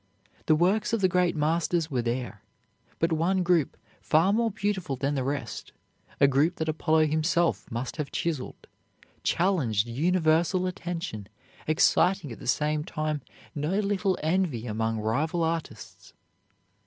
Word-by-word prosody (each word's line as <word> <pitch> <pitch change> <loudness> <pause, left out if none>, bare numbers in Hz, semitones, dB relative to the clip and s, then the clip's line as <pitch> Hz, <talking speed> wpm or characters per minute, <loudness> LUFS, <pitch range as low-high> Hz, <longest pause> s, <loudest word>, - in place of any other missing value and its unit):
The 155 - +5
works 195 +8 +1
of 230 - +1
the 190 - +5
great 180 -1 +1
masters 160 +1 0
were 125 -3 0
there. 120 +1 -3 0.6
But 165 +1 +1
one 180 +4 +1
group, 170 -5 +1 0.2
far 165 +6 +3
more 230 +1 +2
beautiful 195 -8 -2
than 140 +3 -1
the 135 -2 -1
rest, 140 +2 -4 0.5
a 140 - +6
group 145 +6 +2
that 160 -3 -3
Apollo 155 0 +2
himself 160 +3 0
must 120 +5 -4
have 150 -3 -4
chiseled, 160 -6 -3 0.6
challenged 150 - +1
universal 165 +6 +2
attention, 170 - -5 0.4
exciting 155 -1 +3
at 115 - -9
the - - -9
same 150 +4 +1
time 155 -1 -3 0.3
no 155 +6 -1
little 200 -2 0
envy 160 -8 0
among 110 0 -1
rival 150 +10 0
artists. 110 - -5
160 Hz, 140 wpm, -27 LUFS, 140-180 Hz, 0.6 s, a